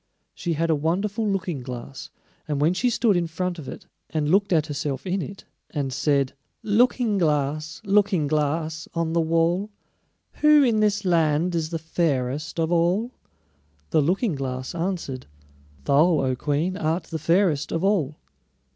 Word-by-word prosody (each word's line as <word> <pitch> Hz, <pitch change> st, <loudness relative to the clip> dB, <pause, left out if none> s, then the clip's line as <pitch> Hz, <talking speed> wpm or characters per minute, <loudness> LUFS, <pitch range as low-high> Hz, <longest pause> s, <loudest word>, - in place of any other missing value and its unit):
She 170 Hz, -3 st, -2 dB
had 165 Hz, +1 st, 0 dB
a -, -, +3 dB
wonderful 195 Hz, +8 st, -1 dB
Looking 185 Hz, -7 st, -2 dB
glass, 125 Hz, +1 st, -8 dB, 0.4 s
and 145 Hz, -2 st, -1 dB
when 155 Hz, +4 st, +3 dB
she 245 Hz, +7 st, +1 dB
stood 230 Hz, -3 st, +2 dB
in 175 Hz, -1 st, +1 dB
front 180 Hz, +1 st, -3 dB
of 140 Hz, -, -8 dB
it, -, -, -9 dB, 0.2 s
and 155 Hz, -1 st, -1 dB
looked 200 Hz, +1 st, +3 dB
at 160 Hz, -3 st, +3 dB
herself 145 Hz, -2 st, -4 dB
in 190 Hz, +1 st, -1 dB
it, 195 Hz, +2 st, -8 dB, 0.3 s
and 140 Hz, -4 st, -3 dB
said: 140 Hz, -1 st, +1 dB, 0.3 s
"Looking 225 Hz, -1 st, +2 dB
glass, 155 Hz, 0 st, -1 dB
Looking 200 Hz, -5 st, +3 dB
glass, 155 Hz, +2 st, -1 dB
on 165 Hz, -1 st, -1 dB
the 170 Hz, -, +3 dB
wall, 165 Hz, +5 st, +1 dB, 0.7 s
Who 300 Hz, -1 st, +7 dB
in 230 Hz, -4 st, +2 dB
this 210 Hz, -1 st, +1 dB
land 165 Hz, 0 st, +2 dB
is 160 Hz, -2 st, -1 dB
the 165 Hz, -, -2 dB
fairest 155 Hz, -2 st, -1 dB
of 165 Hz, +1 st, 0 dB
all?" 180 Hz, +8 st, +2 dB, 0.8 s
the 155 Hz, -, +4 dB
Looking 185 Hz, -, +1 dB
glass 130 Hz, -2 st, -4 dB
answered: 170 Hz, -7 st, -3 dB, 0.6 s
"Thou, 155 Hz, -, +4 dB
O 130 Hz, -1 st, 0 dB
Queen, 150 Hz, +7 st, -1 dB
art 165 Hz, 0 st, -1 dB
the 160 Hz, -, -5 dB
fairest 165 Hz, -1 st, +2 dB
of 165 Hz, +2 st, -1 dB
all!" 180 Hz, -8 st, +1 dB
165 Hz, 160 wpm, -24 LUFS, 150-190 Hz, 0.8 s, Who